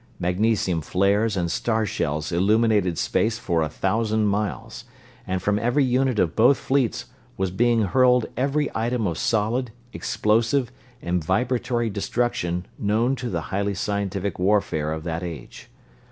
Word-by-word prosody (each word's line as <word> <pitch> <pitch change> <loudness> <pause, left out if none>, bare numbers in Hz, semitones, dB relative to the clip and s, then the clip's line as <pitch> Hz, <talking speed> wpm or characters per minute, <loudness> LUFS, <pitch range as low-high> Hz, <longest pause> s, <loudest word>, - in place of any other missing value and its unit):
Magnesium 90 -1 +1
flares 100 +6 +1
and 85 -2 -1
star 110 -2 0
shells 75 -4 -2
illuminated 100 -1 +2
space 110 0 0
for 85 -7 -1
a 80 - 0
thousand 110 +6 0
miles, 105 0 -2 0.4
and 95 0 -2
from 105 0 +1
every 120 +5 +2
unit 130 -1 +1
of 85 -4 +1
both 125 +4 +5
fleets 130 -3 0 0.3
was 95 -1 -1
being 115 +3 +2
hurled 125 +4 +3
every 140 +4 0
item 115 0 -1
of 85 -4 -2
solid, 115 +3 0 0.2
explosive, 115 +4 +1 0.3
and 85 -1 -1
vibratory 120 +4 0
destruction 95 -4 -1
known 110 +6 +1
to 125 0 -4
the - - -2
highly 100 +1 0
scientific 100 -1 -2
warfare 90 -6 +1
of 80 0 -4
that 85 0 -3
age. 85 -7 -8
105 Hz, 140 wpm, -24 LUFS, 90-120 Hz, 0.4 s, both